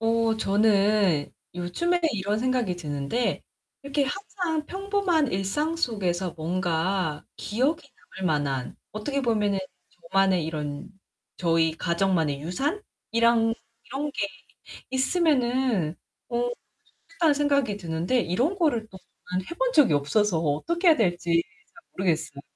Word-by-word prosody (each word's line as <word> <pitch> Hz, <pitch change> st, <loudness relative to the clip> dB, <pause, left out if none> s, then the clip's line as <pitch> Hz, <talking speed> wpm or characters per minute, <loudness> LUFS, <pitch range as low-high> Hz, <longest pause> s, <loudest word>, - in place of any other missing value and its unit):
어 225 Hz, 0 st, +2 dB
저는 200 Hz, -6 st, +3 dB, 0.2 s
요즘에 260 Hz, -, 0 dB
이런 205 Hz, 0 st, -1 dB
생각이 245 Hz, -6 st, 0 dB
드는데 150 Hz, -, -2 dB, 0.4 s
이렇게 280 Hz, +1 st, 0 dB
항상 330 Hz, -1 st, -3 dB
평범한 385 Hz, -6 st, 0 dB
일상 245 Hz, -, -1 dB
속에서 190 Hz, -, -1 dB
뭔가 170 Hz, -1 st, -1 dB
기억에 265 Hz, +9 st, 0 dB, 0.4 s
남을 190 Hz, -, 0 dB
만한, 140 Hz, -5 st, -1 dB, 0.2 s
어떻게 275 Hz, +7 st, -2 dB
보면은 210 Hz, -5 st, +1 dB, 0.5 s
저만의 190 Hz, -3 st, +3 dB
이런 150 Hz, -2 st, -4 dB, 0.5 s
저희 165 Hz, -2 st, +2 dB
가정만의 170 Hz, -5 st, +1 dB
유산? 275 Hz, -, -2 dB, 0.3 s
이랑 230 Hz, 0 st, +4 dB, 0.3 s
'이런 280 Hz, +4 st, -3 dB
게 200 Hz, -, -1 dB, 0.6 s
있으면은 260 Hz, -, +1 dB, 0.3 s
어 240 Hz, -1 st, 0 dB, 0.6 s
좋겠다.'는 335 Hz, -7 st, +1 dB
생각이 280 Hz, -7 st, +1 dB
드는데 175 Hz, +7 st, 0 dB
이런 250 Hz, -, 0 dB
거를 300 Hz, -, +2 dB
그동안 190 Hz, -4 st, -14 dB, 0.5 s
해 -, -, -4 dB
본 -, -, +1 dB
적이 285 Hz, -, +5 dB
없어서 170 Hz, +6 st, +2 dB
어떻게 170 Hz, -, +1 dB
해야 320 Hz, -, +7 dB
될지 175 Hz, -5 st, +2 dB, 0.3 s
잘 345 Hz, -, -16 dB
모르겠어요. 160 Hz, -6 st, -1 dB
210 Hz, 270 characters per minute, -26 LUFS, 175-280 Hz, 0.6 s, 해야